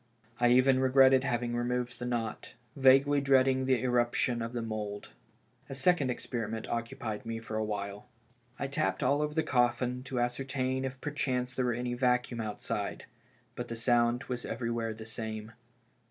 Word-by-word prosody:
1 120 0 +4
even 130 +1 +5
regretted 130 0 +5
having 120 -1 -1
removed 120 0 -2
the 125 - -3
knot, 115 -3 -3 0.2
vaguely 135 +2 +5
dreading 130 -1 +3
the 130 -1 +2
irruption 120 -1 +1
of 115 0 -3
tlie 120 -2 -3
mould. 105 -2 -5 0.6
A 135 - -5
second 140 0 +2
experiment 115 -3 -3
occu 115 +3 -3
pied 110 -5 -4
me 115 0 -4
for 110 -1 -7
awhile. 105 0 -3 0.5
I - - -2
tapped 140 +2 -1
all 140 +3 +2
over 150 0 -2
the 160 - +2
coffin 125 0 +1
to 130 - -6
ascer 125 +2 -1
tain 130 -1 -1
if 130 0 -5
perchance 130 -4 -2
there 130 - 0
were 120 - +1
any 120 +1 -2
vacuum 125 -1 +1
outside. 105 -1 -4 0.5
But 120 - -5
the 115 - -5
sound 120 +1 +2
was 125 -1 -4
everywhere 115 -1 -3
the 110 0 -9
same. 110 -1 -5
125 Hz, 170 wpm, -31 LUFS, 115-130 Hz, 0.6 s, even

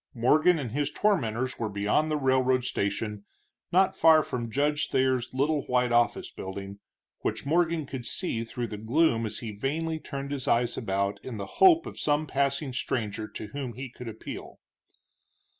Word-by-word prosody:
Morgan 155 +9 +4
and 130 -7 -4
his 145 +3 0
tormenters 130 - 0
were 110 -2 -1
beyond 105 +10 +1
the 155 - +1
railroad 130 -2 +2
station, 105 -1 -2 0.5
not 190 +2 +4
far 160 -1 +6
from 120 -4 -4
Judge 145 +5 +1
Thayer's 130 -1 +1
little 145 +3 +1
white 125 -1 +2
office 120 0 +2
building, 100 +1 -7 0.4
which - - -2
Morgan 165 0 +1
could 130 -3 -6
see 115 -11 -1
through 120 +1 -4
the 105 -3 -6
gloom 115 0 +2
as 105 - -5
he 110 - -4
vainly 155 +9 -2
turned 140 -2 -6
his 140 -3 -4
eyes 120 0 +2
about 100 -2 -2
in 125 -4 -6
the 100 - -4 0.2
hope 345 -3 +7
of - - -7
some 150 +1 +1
passing 140 -1 -1
stranger 110 -4 -2
to 105 - -8
whom 130 0 -5
he 130 +1 -6
could 125 -1 -9
appeal. 110 -1 -8
130 Hz, 170 wpm, -28 LUFS, 115-150 Hz, 0.5 s, hope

